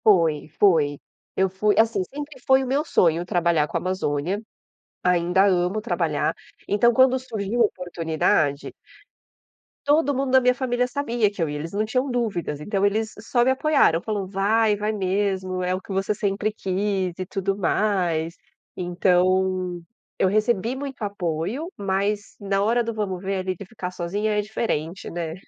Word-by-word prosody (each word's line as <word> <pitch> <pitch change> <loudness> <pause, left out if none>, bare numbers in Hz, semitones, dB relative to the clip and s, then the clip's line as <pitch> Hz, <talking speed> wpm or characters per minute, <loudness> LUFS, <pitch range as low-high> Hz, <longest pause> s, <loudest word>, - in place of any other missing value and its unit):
Foi, 165 -8 +3
foi. 155 -7 +4 0.4
Eu 190 - +3
fui 205 +3 +1
assim, 225 -3 +3
sempre 290 +6 -8
foi 265 0 +5
o - - -4
meu 275 +4 +1
sonho 170 - +2
trabalhar 170 -4 +2
com - - -2
a - - -1
Amazônia, 185 0 -1 0.6
ainda 180 +2 +3
amo 185 +1 +2
trabalhar, 230 - 0 0.3
então 225 +4 +4
quando 260 +2 +4
surgiu 225 -2 -2
a - - +7
oportunidade 160 -6 0 1.1
todo 290 0 +3
mundo 270 0 -1
da 260 0 +6
minha 250 0 +4
família 250 -1 0
sabia 240 -6 0
que 200 - -6
eu 160 - +1
ia, 150 - -4
eles 165 +2 -6
não 210 +2 0
tinham 255 +5 -1
dúvidas, 200 -11 -2
então 200 +4 0
eles 220 +2 0
só 240 +3 +1
me 260 - +3
apoiaram, 265 - +3
falou: 205 -2 -3
"Vai, 210 +3 +2
vai 210 +1 -1
mesmo, 190 -2 -1
é 180 0 0
o 185 - -5
que 195 - -11
você 195 +2 0
sempre 205 +1 -1
quis 190 -2 -1
e 185 - -4
tudo 195 +1 -2
mais." 175 -4 0 0.4
Então, 180 0 +1 0.4
eu - - +4
recebi 215 +3 +1
muito 270 -2 -6
apoio, 200 - -3
mas 200 +2 -1
na 195 -1 0
hora 235 +3 +2
do 230 0 -3
vamos 195 -4 -3
ver 195 0 -1
ali 185 0 -2
de 200 - -9
ficar 185 -2 -6
sozinha 195 +5 -2
é - - +3
diferente, 195 -5 -3
né? 165 -2 -4
195 Hz, 165 wpm, -24 LUFS, 180-225 Hz, 1.1 s, a